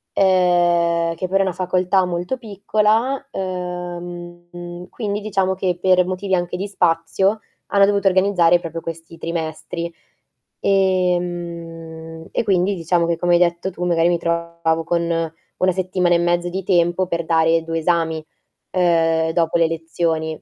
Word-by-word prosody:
uhm, 175 Hz, -3 st, +3 dB
che 185 Hz, -, -3 dB
però 195 Hz, -, +2 dB
è 195 Hz, -, +3 dB
una 185 Hz, -, -1 dB
facoltà 185 Hz, +1 st, +1 dB
molto 180 Hz, +7 st, -3 dB
piccola, 220 Hz, +5 st, 0 dB
uhm, 175 Hz, -1 st, -6 dB
quindi 210 Hz, -2 st, -3 dB
diciamo 195 Hz, -2 st, 0 dB
che 185 Hz, -2 st, -1 dB
per 185 Hz, -1 st, +4 dB
motivi 185 Hz, +1 st, -1 dB
anche 175 Hz, 0 st, -2 dB
di 200 Hz, +2 st, -3 dB
spazio, 190 Hz, +3 st, +1 dB, 0.3 s
hanno 200 Hz, -1 st, +4 dB
dovuto 200 Hz, -1 st, +1 dB
organizzare 180 Hz, -2 st, +3 dB
proprio 165 Hz, -1 st, -6 dB
questi 165 Hz, 0 st, -8 dB
trimestri. 165 Hz, 0 st, -4 dB, 0.7 s
Ehm, 170 Hz, -4 st, -1 dB
e -, -, 0 dB
quindi 190 Hz, 0 st, +2 dB
diciamo 170 Hz, 0 st, +1 dB
che 170 Hz, -1 st, 0 dB
come 175 Hz, 0 st, +1 dB
hai 175 Hz, -, +5 dB
detto 175 Hz, +1 st, +1 dB
tu 175 Hz, -, -6 dB
magari 170 Hz, -1 st, +3 dB
mi 175 Hz, -, +2 dB
trovavo 170 Hz, -1 st, -1 dB
con 170 Hz, -1 st, +1 dB, 0.6 s
una 185 Hz, 0 st, +2 dB
settimana 180 Hz, -1 st, +1 dB
e -, -, +3 dB
mezzo 175 Hz, 0 st, +1 dB
di 190 Hz, +2 st, -4 dB
tempo 175 Hz, 0 st, +2 dB
per 170 Hz, -2 st, -2 dB
dare 165 Hz, 0 st, +3 dB
2 165 Hz, 0 st, -2 dB
esami, 160 Hz, -2 st, 0 dB, 0.5 s
uhm, 165 Hz, -2 st, +2 dB
dopo 165 Hz, 0 st, +1 dB
le 165 Hz, -, +3 dB
lezioni. 160 Hz, -1 st, -2 dB
175 Hz, 145 wpm, -20 LUFS, 165-185 Hz, 0.7 s, hai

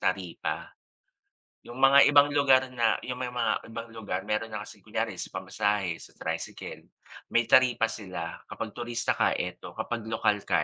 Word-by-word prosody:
taripa. 90 Hz, -2 st, -2 dB, 1.0 s
Yung 120 Hz, -, -9 dB
mga 140 Hz, +1 st, +8 dB
ibang 145 Hz, 0 st, +6 dB
lugar 135 Hz, -2 st, +4 dB
na 120 Hz, -3 st, +2 dB
yung 125 Hz, 0 st, -5 dB
may 130 Hz, -, -2 dB
mga 115 Hz, -3 st, 0 dB
ibang 115 Hz, 0 st, -7 dB
lugar 100 Hz, -5 st, -4 dB
meron 110 Hz, +1 st, -1 dB
na 105 Hz, -, -3 dB
kasing -, -, -12 dB
kunyari 110 Hz, -3 st, -2 dB
sa -, -, -3 dB
pamasahe 95 Hz, -1 st, -1 dB
sa -, -, -13 dB
tricycle, -, -, -5 dB, 0.5 s
may 120 Hz, -, +5 dB
taripa 125 Hz, -3 st, +5 dB
sila 95 Hz, -6 st, -6 dB
kapag 110 Hz, -, -5 dB
turista 120 Hz, 0 st, -1 dB
ka -, -, +3 dB
eto, -, -, -5 dB
kapag 115 Hz, -2 st, -4 dB
lokal 110 Hz, -2 st, +1 dB
ka -, -, +3 dB
115 Hz, 165 wpm, -28 LUFS, 105-125 Hz, 1.0 s, mga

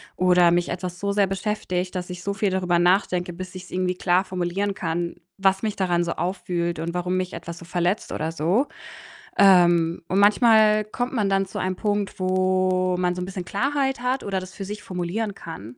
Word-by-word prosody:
oder 180 Hz, -1 st, +4 dB
mich 175 Hz, 0 st, +1 dB
etwas 180 Hz, 0 st, -5 dB
so 200 Hz, 0 st, 0 dB
sehr 200 Hz, -1 st, +2 dB
beschäftigt, 190 Hz, -2 st, -2 dB
dass 180 Hz, 0 st, -4 dB
ich 180 Hz, -1 st, -7 dB
so 200 Hz, -, -1 dB
viel 200 Hz, 0 st, 0 dB
darüber 180 Hz, -2 st, +1 dB
nachdenke, 180 Hz, -1 st, +2 dB
bis 185 Hz, +1 st, -8 dB
ich's 185 Hz, -, -9 dB
irgendwie 185 Hz, 0 st, -1 dB
klar 180 Hz, +1 st, +2 dB
formulieren 185 Hz, +2 st, -2 dB
kann, 170 Hz, 0 st, -2 dB, 0.2 s
was 195 Hz, 0 st, +2 dB
mich 215 Hz, -2 st, -2 dB
daran 175 Hz, -2 st, +1 dB
so 170 Hz, -, -2 dB
aufwühlt 175 Hz, -1 st, -2 dB
und 170 Hz, +1 st, -3 dB
warum 180 Hz, +1 st, -1 dB
mich 185 Hz, 0 st, -3 dB
etwas 170 Hz, 0 st, -7 dB
so 170 Hz, -, -11 dB
verletzt 175 Hz, +3 st, -1 dB
oder 160 Hz, +1 st, -2 dB
so. 175 Hz, -, +1 dB, 0.7 s
Ähm, 175 Hz, -4 st, +5 dB
und 190 Hz, +2 st, +2 dB
manchmal 215 Hz, 0 st, +5 dB
kommt 245 Hz, +4 st, -4 dB
man 210 Hz, -5 st, +1 dB
dann 195 Hz, 0 st, +2 dB
zu -, -, -8 dB
einem 185 Hz, 0 st, -2 dB
Punkt, 205 Hz, -2 st, -2 dB
wo 185 Hz, 0 st, +1 dB
man 180 Hz, 0 st, +1 dB
so 180 Hz, -, -4 dB
'n -, -, -2 dB
bisschen 185 Hz, -1 st, -6 dB
Klarheit 270 Hz, +3 st, -1 dB
hat 255 Hz, +2 st, -1 dB
oder 195 Hz, -2 st, -1 dB
das 185 Hz, 0 st, -10 dB
für 195 Hz, -, -6 dB
sich 210 Hz, +1 st, -7 dB
formulieren 185 Hz, +4 st, -3 dB
kann, 145 Hz, -, -9 dB
185 Hz, 200 wpm, -24 LUFS, 175-200 Hz, 0.7 s, Ähm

